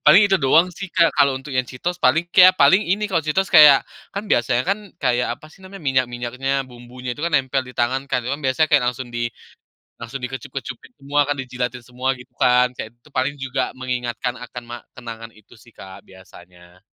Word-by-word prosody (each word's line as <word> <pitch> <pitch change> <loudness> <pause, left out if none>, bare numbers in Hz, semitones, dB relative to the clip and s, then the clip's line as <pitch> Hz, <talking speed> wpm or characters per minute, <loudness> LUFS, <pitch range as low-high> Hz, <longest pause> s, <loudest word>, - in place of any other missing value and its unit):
Paling, 160 +8 +8
itu 195 -1 +3
doang 155 +5 +4
sih 195 +3 -7
Kak, 170 -1 +3
kalau 140 -1 +3
untuk 135 +2 -10
yang 130 0 +1
Cheetos, 175 +7 -4
paling 145 +7 +3
kayak 185 0 +7
paling 190 +2 +6
ini, 210 +2 -1
kalau 170 -4 +1
Cheetos, 190 +6 0
kayak. 145 -3 +8 0.3
Kan, 200 +2 -4
biasanya 120 +1 +2
kan, 200 - +1 0.2
kayak, 125 -2 0
apa 155 - -16
sih - - -20
namanya, 190 0 -11
minyak-minyaknya, 130 +1 -1
bumbunya 125 +1 -8
itu 145 - -10
kan 170 - -2
nempel 130 0 0
di 125 - -12
tangan 130 +3 0
kan, 125 -3 -1
itu 125 - -3
kan 145 - -4
biasanya 155 +4 +2
kayak, 140 -4 +4
langsung 125 0 -8
di 120 0 -2 0.7
langsung 120 +3 -6
di 125 - -5
kecup-kecupin 130 - -7
semua 145 +1 -2
kan, 145 - +1
dijilatin 125 -1 -4
semua, 125 +1 -4
gitu 125 0 -16
kan. 125 0 +4
Kayak, 110 - -5
itu - - -44
tuh 150 - -21
paling 135 +3 0
juga 135 0 -2
mengingatkan 125 -1 -3
akan, 125 0 -9
ma 120 - -6 0.2
kenangan 115 -2 -9
itu 110 -1 -21
sih 115 +1 -19
Kak, 95 -2 -12
biasanya. 90 -1 -17
130 Hz, 210 wpm, -21 LUFS, 120-145 Hz, 0.7 s, Paling